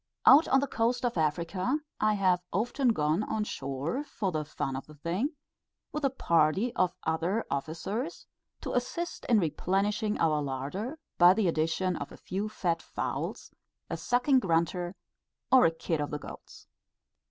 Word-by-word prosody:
Out 295 +4 +8
on 270 0 +4
the - - +1
coast 240 +1 0
of 240 - 0
Africa, 175 - 0 0.2
I 215 0 +3
have 185 -3 +2
often 245 +7 0
gone 155 -5 +2
on 215 0 -1
shore 150 - -3
for 200 -9 -3
the 155 -2 -1
fun 135 -2 -4
of 135 - -6
the 155 - -13
thing 180 - -2 0.6
with 300 - -4
a 275 - +4
party 185 - +2
of 185 -1 +1
other 170 +7 0
officers, 180 - -3 0.4
to - - -4
assist 335 +8 -2
in 230 -3 +4
replenishing 200 +5 0
our 155 -2 +2
larder 145 - -4 0.2
by 175 +1 +8
the 220 -4 +2
addition 165 +3 0
of - - -6
a - - -11
few 200 +4 -3
fat 170 -6 -1
fowls, - - -4 0.4
a - - 0
sucking 255 +2 +3
grunter, 175 -1 0 0.6
or 260 -6 +7
a - - +1
kid 165 -1 -2
of 145 - -2
the 150 - -3
goats. - - -11
185 Hz, 165 wpm, -29 LUFS, 160-235 Hz, 0.6 s, Out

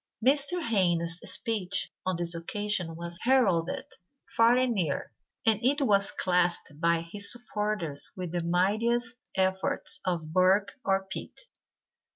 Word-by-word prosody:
Mr. 285 +6 +2
Hayne's 175 - +1
speech 200 -3 -1 0.2
on 185 - +1
this 170 0 -2
occasion 180 0 -1
was 170 +1 -7
heralded 235 -4 +2 0.4
far 230 +1 +4
and 255 -1 +2
near, 170 -9 -1 0.3
and 220 -1 +3
it 280 +4 +3
was 200 -7 +4
classed 180 -3 0
by 170 0 +2
his 200 +5 -1
supporters 210 -10 -3
with 180 -3 -4
the 175 -1 -2
mightiest 220 +8 +1 0.2
efforts 190 0 +1
of 165 -4 -3
Burke 190 +2 +3
or 195 0 +1
Pitt. 190 - -7
190 Hz, 130 wpm, -28 LUFS, 170-230 Hz, 0.4 s, far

